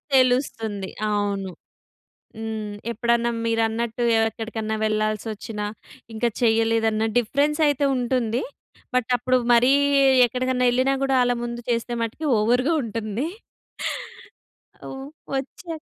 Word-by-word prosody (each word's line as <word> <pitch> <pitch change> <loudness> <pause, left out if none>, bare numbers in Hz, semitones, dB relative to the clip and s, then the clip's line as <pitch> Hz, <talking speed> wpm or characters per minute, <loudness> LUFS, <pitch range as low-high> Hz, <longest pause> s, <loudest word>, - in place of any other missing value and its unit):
తెలుస్తుంది. 230 -6 +1 0.2
అవును. 200 -2 -1 0.9
హ్మ్. 220 -2 -4 0.2
ఎప్పుడన్నా 235 +1 +1
మీరన్నట్టు 225 +1 0 0.2
ఎక్కడికన్నా 225 -1 -2
వెళ్ళాల్సి 215 0 0
వచ్చిన 210 0 -7 0.5
ఇంకా 235 +2 +1
చేయలేదన్న 225 -1 +2
డిఫరెన్స్ 285 +6 +1
అయితే 285 0 +1
ఉంటుంది. 245 -1 0 0.5
బట్ 255 -2 +1
అప్పుడు 255 +1 +1
మరి 245 +3 +5 0.5
ఎక్కడికన్నా 250 +1 0
యెళ్ళినా 260 +2 +2
కూడా 270 - +1
ఆళ్ళ 245 - +2
ముందు 240 0 -5
చేసే 235 +1 -1
మట్టికి 235 +8 -3
ఓవ‌ర్‌గా 250 +8 +2
ఉంటుంది. 225 +3 -3 1.6
అవు 265 - -7 0.4
వచ్చే 320 +5 -5
235 Hz, 100 wpm, -23 LUFS, 220-255 Hz, 1.6 s, మరి